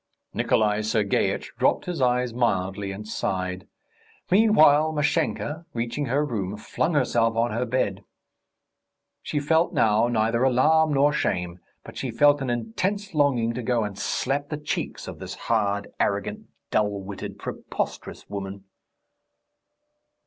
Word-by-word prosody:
Nikolay 105 Hz, -1 st, +2 dB
Sergeitch 105 Hz, -1 st, 0 dB
dropped -, -, +2 dB
his 175 Hz, -5 st, -3 dB
eyes 125 Hz, -1 st, +2 dB
mildly 100 Hz, -4 st, 0 dB
and 105 Hz, +2 st, -7 dB
sighed. 90 Hz, -3 st, -3 dB, 0.6 s
Meanwhile 160 Hz, -7 st, +5 dB
Mashenka, 155 Hz, +1 st, -1 dB
reaching 120 Hz, +5 st, -2 dB
her 140 Hz, +5 st, +1 dB
room, 105 Hz, -6 st, -3 dB
flung 130 Hz, +8 st, -1 dB
herself 115 Hz, -4 st, +2 dB
on 115 Hz, +1 st, +1 dB
her 120 Hz, +3 st, -1 dB
bed. 100 Hz, -5 st, -1 dB, 1.2 s
She 150 Hz, -, -2 dB
felt 160 Hz, +4 st, +2 dB
now 110 Hz, +1 st, +3 dB
neither 115 Hz, 0 st, +1 dB
alarm 150 Hz, +5 st, +4 dB
nor 145 Hz, +1 st, +3 dB
shame, 90 Hz, -9 st, -1 dB, 0.2 s
but -, -, -11 dB
she -, -, -3 dB
felt 145 Hz, -1 st, +4 dB
an 135 Hz, -, -2 dB
intense 185 Hz, -, -2 dB
longing 130 Hz, -6 st, +2 dB
to 125 Hz, -, -4 dB
go 120 Hz, -1 st, +1 dB
and 105 Hz, -2 st, -4 dB
slap 135 Hz, +7 st, -2 dB
the 150 Hz, -, -3 dB
cheeks 150 Hz, -, -4 dB
of -, -, -8 dB
this -, -, -6 dB
hard, 100 Hz, -3 st, 0 dB
arrogant, 100 Hz, +1 st, -1 dB, 0.2 s
dull 105 Hz, -1 st, +1 dB
witted, 100 Hz, 0 st, -7 dB, 0.3 s
prosperous -, -, -4 dB
woman. 100 Hz, -1 st, -6 dB
120 Hz, 135 wpm, -25 LUFS, 105-145 Hz, 1.2 s, Meanwhile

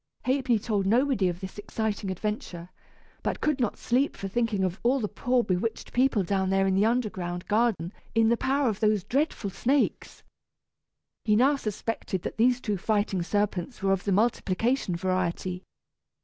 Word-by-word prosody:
Ha'penny 255 Hz, -2 st, +2 dB
told 205 Hz, -3 st, -1 dB
nobody 235 Hz, -3 st, +3 dB
of 175 Hz, +1 st, -5 dB
this 190 Hz, +2 st, -7 dB
exciting 210 Hz, -1 st, -3 dB
adventure, 185 Hz, -3 st, -4 dB, 0.5 s
but -, -, -2 dB
could 305 Hz, -3 st, 0 dB
not 235 Hz, -5 st, 0 dB
sleep 260 Hz, +4 st, 0 dB
for 195 Hz, -, -4 dB
thinking 220 Hz, -1 st, 0 dB
of 185 Hz, +1 st, -1 dB
all 255 Hz, +3 st, +2 dB
the 215 Hz, -, -1 dB
poor 250 Hz, +3 st, +1 dB
bewitched 195 Hz, +3 st, -2 dB
people 250 Hz, -5 st, +3 dB
down 190 Hz, +1 st, 0 dB
there 195 Hz, 0 st, +2 dB
in 190 Hz, -, +2 dB
the 200 Hz, +3 st, +3 dB
underground 190 Hz, -7 st, -2 dB
garden 210 Hz, -5 st, +1 dB, 0.2 s
in 225 Hz, 0 st, +4 dB
the 235 Hz, -, +4 dB
power 270 Hz, +3 st, +1 dB
of 215 Hz, -3 st, -1 dB
those 215 Hz, -3 st, +2 dB
dreadful 270 Hz, -, -1 dB
snakes. 270 Hz, +8 st, 0 dB, 1.0 s
He 210 Hz, -, +3 dB
now 265 Hz, +6 st, +4 dB
suspected 215 Hz, -5 st, -3 dB
that -, -, -5 dB
these 245 Hz, +2 st, +3 dB
two 210 Hz, -5 st, -2 dB
fighting 205 Hz, -1 st, 0 dB
serpents 205 Hz, +4 st, -2 dB
were 195 Hz, -, +3 dB
of 195 Hz, -, -2 dB
the 200 Hz, -, 0 dB
multiplication 220 Hz, 0 st, +1 dB
variety. 185 Hz, 0 st, -1 dB
210 Hz, 165 wpm, -27 LUFS, 190-240 Hz, 1.0 s, in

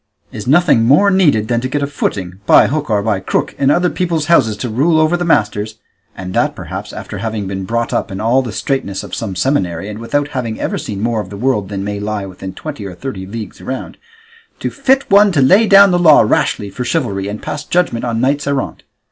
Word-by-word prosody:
Is 105 Hz, 0 st, -7 dB
nothing 155 Hz, -3 st, +4 dB
more 150 Hz, -, +4 dB
needed 150 Hz, -, +3 dB
than 120 Hz, 0 st, 0 dB
to 130 Hz, -, -2 dB
get 145 Hz, +2 st, -2 dB
a -, -, +2 dB
footing, 95 Hz, -10 st, -3 dB
by -, -, +7 dB
hook 150 Hz, 0 st, -2 dB
or 105 Hz, -2 st, +1 dB
by 105 Hz, -3 st, 0 dB
crook, 95 Hz, -, -2 dB
in 135 Hz, -, +3 dB
other 175 Hz, +4 st, +2 dB
people's 170 Hz, -4 st, -1 dB
houses 115 Hz, -10 st, +3 dB
to 125 Hz, -, -4 dB
rule 155 Hz, +9 st, +2 dB
over 155 Hz, +2 st, +3 dB
the 175 Hz, -, -2 dB
masters 110 Hz, -8 st, 0 dB, 0.4 s
(and 90 Hz, -1 st, -6 dB
that, -, -, +1 dB
perhaps, -, -, -7 dB
after -, -, -7 dB
having 110 Hz, -1 st, -3 dB
been 95 Hz, 0 st, -4 dB
brought 115 Hz, +3 st, -2 dB
up -, -, -1 dB
in 95 Hz, -, -5 dB
all 120 Hz, +4 st, +2 dB
the 120 Hz, -4 st, -5 dB
straitness 100 Hz, -4 st, -2 dB
of -, -, -11 dB
some 100 Hz, -5 st, -4 dB
seminary, 95 Hz, -, -1 dB
and 105 Hz, 0 st, -7 dB
without 145 Hz, +5 st, -1 dB
having 120 Hz, -6 st, -4 dB
ever -, -, -2 dB
seen 100 Hz, -2 st, -5 dB
more 115 Hz, -2 st, 0 dB
of -, -, -9 dB
the 100 Hz, -, -8 dB
world 105 Hz, -4 st, 0 dB
than 95 Hz, -1 st, -4 dB
may 100 Hz, 0 st, -4 dB
lie 105 Hz, -1 st, -3 dB
within 95 Hz, 0 st, -8 dB
twenty 145 Hz, -8 st, -7 dB
or 95 Hz, -2 st, -7 dB
thirty 95 Hz, -4 st, -6 dB
leagues 110 Hz, -1 st, -8 dB
round), 130 Hz, 0 st, -6 dB, 0.6 s
to -, -, -3 dB
fit 270 Hz, -1 st, +1 dB
one 200 Hz, +1 st, +6 dB
to 150 Hz, -, +1 dB
lay 190 Hz, +12 st, +5 dB
down 200 Hz, -1 st, +7 dB
the 175 Hz, -, +2 dB
law 160 Hz, -4 st, +7 dB
rashly 105 Hz, -2 st, 0 dB
for 125 Hz, +5 st, -4 dB
chivalry, 110 Hz, -9 st, -2 dB
and 105 Hz, +1 st, -6 dB
pass 150 Hz, -, -4 dB
judgment 175 Hz, -10 st, 0 dB
on 115 Hz, -2 st, -1 dB
knights 140 Hz, +3 st, 0 dB
errant? 140 Hz, -1 st, -2 dB
120 Hz, 230 wpm, -16 LUFS, 105-150 Hz, 0.6 s, by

